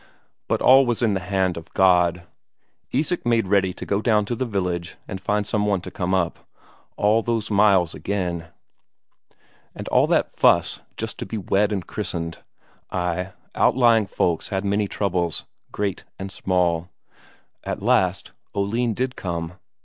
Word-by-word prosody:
But - - 0
all 135 +1 +8
was 120 0 0
in 110 -3 +3
the 95 - 0
hand 95 -1 0
of 80 - -9
God. 90 -2 +4 0.7
Isak 155 +7 0
made 115 -2 +2
ready 95 -1 +3
to - - -7
go 100 +1 0
down 110 -3 +2
to 120 - -2
the 130 +2 -2
village 90 -5 -2
and 95 - -6
find 105 +1 0
some 105 0 0
one 100 -2 +2
to 95 - -8
come 90 +1 -1
up. 85 -3 0 0.6
All 105 +2 +3
those 115 -2 -2
miles 100 -5 +4
again! 90 -4 -3 1.3
And - - -7
all - - +4
that - - +2
fuss - - +3 0.2
just - - -4
to - - -5
be 110 - -4
wed 100 +1 +1
and 95 -4 -2
christened. 85 -5 -4 0.5
Ay, 90 +1 -2 0.2
outlying 115 -4 +4
folks 85 -3 -1
had 95 0 -2
many 100 +1 +1
troubles, 90 -5 -1 0.3
great 100 -2 -2
and 95 0 -6
small. 90 -3 0 0.7
At - - -4
last - - +2 0.2
Oline 110 +3 0
did 130 0 -2
come.... 85 -2 -4
100 Hz, 155 wpm, -23 LUFS, 90-105 Hz, 1.3 s, all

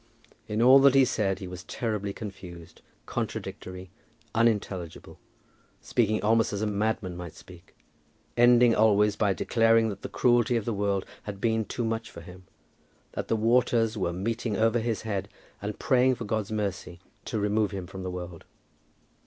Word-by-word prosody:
In 110 +2 0
all 130 +3 +8
that 135 0 +5
he 135 -1 +6
said 100 -5 0
he 95 -2 -7
was 90 0 -8
terribly 105 -4 -3
confused, 90 -5 -10 0.2
contradictory, 90 0 -5 0.4
unintelligible, 105 -7 -1 0.6
speaking 110 -2 0
almost 115 +1 +3
as 100 +1 -2
a - - +1
madman 105 -3 -1
might 85 -2 -8
speak, 85 0 -16 0.6
ending 120 0 +6
always 105 -1 +3
by 105 -3 +1
declaring 115 +2 +3
that 100 - -7
the - - -6
cruelty 120 -1 +2
of 110 - -3
the 115 - -1
world 100 -1 -1 0.2
had 100 -2 -6
been 110 0 0
too 120 - -3
much 115 0 -3
for - - -11
him, 90 +2 -13 0.7
that - - -5
the - - +1
waters 115 0 +2
were 95 -5 -1
meeting 110 +4 -2
over 115 +1 +2
his 115 -1 -2
head, 100 -3 -3 0.3
and 105 +1 -4
praying 130 -2 +3
for 115 - -6
God's 110 -1 -2
mercy 95 -4 -3 0.3
to 110 - -3
remove 105 0 +1
him 95 -2 -6
from 95 +1 -9
the 95 - -4
world. 90 -2 -7
105 Hz, 165 wpm, -27 LUFS, 95-115 Hz, 0.7 s, all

